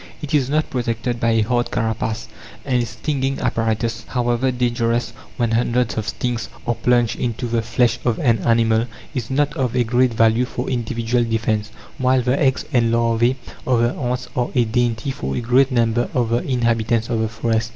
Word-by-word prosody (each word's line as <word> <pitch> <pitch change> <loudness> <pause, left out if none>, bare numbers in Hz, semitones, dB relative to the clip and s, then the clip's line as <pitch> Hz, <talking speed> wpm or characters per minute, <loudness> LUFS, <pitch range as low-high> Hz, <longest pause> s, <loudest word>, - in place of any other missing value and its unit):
It 150 0 -6
is 135 -3 +2
not 155 +2 0
protected 120 -1 -2
by 115 - +1
a 115 - +3
hard 120 +2 0
carapace, 110 0 -2 0.4
and 125 -3 +1
its 120 - -3
stinging 135 +1 -1
apparatus, 115 0 -1
however 120 +1 0
dangerous 120 -1 0 0.2
when 120 -2 +1
hundreds 120 +1 +1
of 110 -1 -3
stings 120 +1 -2 0.2
are 120 - +1
plunged 120 -1 +1
into 120 0 -2
the 115 -1 0
flesh 120 +2 +1
of 120 -3 +1
an 115 -5 +2
animal, 115 +1 +2 0.3
is 120 -4 -3
not 145 +2 +1
of 130 -2 -1
a 125 - +3
great 120 +1 +2
value 115 +2 +3
for 125 +1 -4
individual 120 0 0
defence; 110 -2 -1 0.3
while 130 0 +3
the 125 +3 +1
eggs 135 -3 +2
and 115 -2 +3
larvae 115 +1 +2 0.3
of 125 -3 +3
the 120 +1 +2
ants 125 -2 -3
are 125 -1 0
a 120 -2 +4
dainty 120 +2 0
for 65 - -4
a - - 0
great 125 +3 +3
number 120 -1 +1
of 120 -3 +1
the 120 +1 +2
inhabitants 115 -3 +1
of 115 - -1
the 110 0 0
forests. 110 0 -1
120 Hz, 190 wpm, -20 LUFS, 115-125 Hz, 0.4 s, a